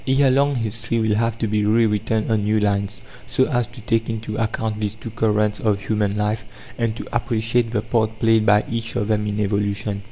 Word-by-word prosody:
Ere 135 Hz, 0 st, +4 dB
long 140 Hz, +2 st, +2 dB
history 115 Hz, 0 st, -1 dB
will 110 Hz, -1 st, +1 dB
have 115 Hz, +1 st, 0 dB
to 115 Hz, -, -1 dB
be 105 Hz, 0 st, 0 dB
re 110 Hz, +2 st, +3 dB
written 110 Hz, +1 st, 0 dB
on 110 Hz, -2 st, +2 dB
new 105 Hz, +1 st, +2 dB
lines, 100 Hz, -1 st, -1 dB, 0.3 s
so 130 Hz, -, +2 dB
as 120 Hz, -6 st, 0 dB
to 120 Hz, -, -11 dB
take 115 Hz, 0 st, 0 dB
into 110 Hz, -1 st, -4 dB
account 110 Hz, -1 st, -2 dB
these 105 Hz, 0 st, -1 dB
two 110 Hz, +1 st, -8 dB
currents 105 Hz, -1 st, +1 dB
of 105 Hz, -3 st, +1 dB
human 105 Hz, -1 st, -1 dB
life 105 Hz, +1 st, -1 dB, 0.3 s
and 115 Hz, -2 st, -1 dB
to -, -, -7 dB
appreciate 115 Hz, 0 st, +1 dB
the 110 Hz, -2 st, -1 dB
part 110 Hz, -1 st, 0 dB
played 115 Hz, 0 st, +3 dB
by 105 Hz, -1 st, +4 dB
each 115 Hz, 0 st, -3 dB
of 100 Hz, -, 0 dB
them 105 Hz, -1 st, 0 dB
in 105 Hz, 0 st, -2 dB
evolution. 100 Hz, 0 st, -1 dB
110 Hz, 215 wpm, -21 LUFS, 105-115 Hz, 0.3 s, Ere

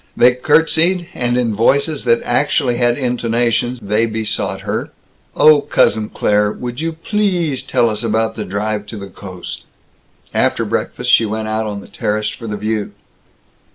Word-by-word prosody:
They 125 Hz, +1 st, +6 dB
curtsied, 165 Hz, +6 st, +2 dB
and 120 Hz, 0 st, 0 dB
in 120 Hz, -3 st, +1 dB
voices 140 Hz, +7 st, +1 dB
that 115 Hz, -1 st, +3 dB
actually 125 Hz, -1 st, +1 dB
had 120 Hz, -1 st, +2 dB
intonations 120 Hz, -1 st, 0 dB
they 105 Hz, +3 st, +1 dB
besought 110 Hz, -1 st, -2 dB
her, -, -, -3 dB, 0.5 s
"Oh, 150 Hz, -1 st, +6 dB
Cousin 110 Hz, -6 st, +1 dB
Claire, 105 Hz, 0 st, +1 dB
would 125 Hz, +4 st, -6 dB
you 165 Hz, 0 st, -2 dB
pleasssssse 175 Hz, -5 st, -1 dB
tell 115 Hz, -, +2 dB
us 105 Hz, -1 st, -2 dB
about 110 Hz, 0 st, 0 dB, 0.2 s
drive 105 Hz, +1 st, -2 dB
to 110 Hz, -, -7 dB
the 100 Hz, -1 st, -8 dB
coast?" 95 Hz, -2 st, -9 dB, 0.7 s
After -, -, +1 dB
breakfast, -, -, -2 dB
she 115 Hz, -, +5 dB
went 110 Hz, +1 st, -3 dB
out 110 Hz, 0 st, -1 dB
on 100 Hz, -1 st, -5 dB
the -, -, -13 dB
terrace 105 Hz, 0 st, -2 dB
for 115 Hz, -, -8 dB
the 105 Hz, -1 st, -3 dB
View. 105 Hz, 0 st, -2 dB
115 Hz, 155 wpm, -17 LUFS, 105-135 Hz, 0.7 s, They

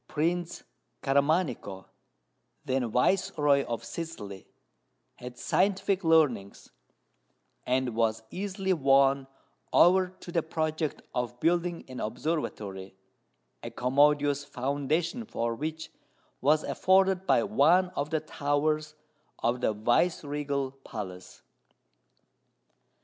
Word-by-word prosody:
Prince 170 Hz, +3 st, -2 dB, 0.4 s
Caramanico, 140 Hz, -, 0 dB, 0.8 s
then 130 Hz, -2 st, 0 dB
viceroy 145 Hz, -, +2 dB
of 115 Hz, -1 st, -4 dB
Sicily, 115 Hz, -, -7 dB, 0.7 s
had 125 Hz, 0 st, -9 dB
scientific 195 Hz, 0 st, +1 dB
leanings, 145 Hz, -12 st, +2 dB, 1.0 s
and 130 Hz, -1 st, +1 dB
was 115 Hz, -1 st, 0 dB
easily 190 Hz, 0 st, -2 dB
won 135 Hz, -3 st, +3 dB, 0.4 s
over 185 Hz, +2 st, +5 dB
to 175 Hz, -, -9 dB
the 170 Hz, -, +1 dB
project 155 Hz, -1 st, -2 dB
of 120 Hz, 0 st, -3 dB
building 170 Hz, +2 st, 0 dB
an 130 Hz, -1 st, -8 dB
observatory, 105 Hz, -, -4 dB, 0.7 s
a -, -, -6 dB
commodious 145 Hz, +2 st, +2 dB
foundation 145 Hz, -, -2 dB
for 115 Hz, -, -2 dB
which 155 Hz, +6 st, -5 dB, 0.5 s
was 150 Hz, +3 st, +3 dB
afforded 190 Hz, 0 st, +2 dB
by -, -, +4 dB
one 185 Hz, -2 st, +3 dB
of 145 Hz, -4 st, -3 dB
the 160 Hz, -1 st, 0 dB
towers 150 Hz, +1 st, -1 dB, 0.5 s
of 120 Hz, +2 st, +1 dB
the -, -, +2 dB
viceregal 140 Hz, +4 st, 0 dB
palace. 90 Hz, -4 st, -8 dB
145 Hz, 95 wpm, -28 LUFS, 125-165 Hz, 1.0 s, over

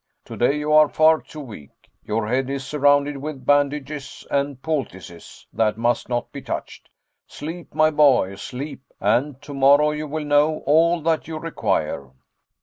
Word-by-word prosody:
"Today 135 Hz, +5 st, 0 dB
you 150 Hz, +1 st, -1 dB
are 155 Hz, -1 st, +6 dB
far 155 Hz, 0 st, +4 dB
too 155 Hz, -, -10 dB
weak. 105 Hz, -, -13 dB
Your 105 Hz, 0 st, -2 dB
head 130 Hz, +3 st, 0 dB
is 135 Hz, -1 st, -4 dB
surrounded 145 Hz, 0 st, +2 dB
with 140 Hz, -2 st, -7 dB
bandages 145 Hz, 0 st, -1 dB
and 140 Hz, -1 st, -1 dB
poultices 95 Hz, -, -6 dB
that 110 Hz, -1 st, +1 dB
must 120 Hz, +1 st, 0 dB
not 120 Hz, -1 st, -2 dB
be -, -, -8 dB
touched. -, -, -6 dB, 0.4 s
Sleep, 165 Hz, +3 st, -8 dB
my 155 Hz, 0 st, +4 dB
boy, 140 Hz, -10 st, +4 dB
sleep, 130 Hz, +7 st, -7 dB, 0.2 s
and 125 Hz, +7 st, 0 dB
tomorrow 145 Hz, +1 st, +4 dB
you 150 Hz, 0 st, -4 dB
will 155 Hz, +1 st, -4 dB
know 150 Hz, +2 st, +2 dB
all 165 Hz, +3 st, +3 dB
that 160 Hz, -1 st, 0 dB
you 160 Hz, -1 st, -5 dB
require." 75 Hz, -, -2 dB
145 Hz, 150 wpm, -22 LUFS, 125-150 Hz, 0.4 s, are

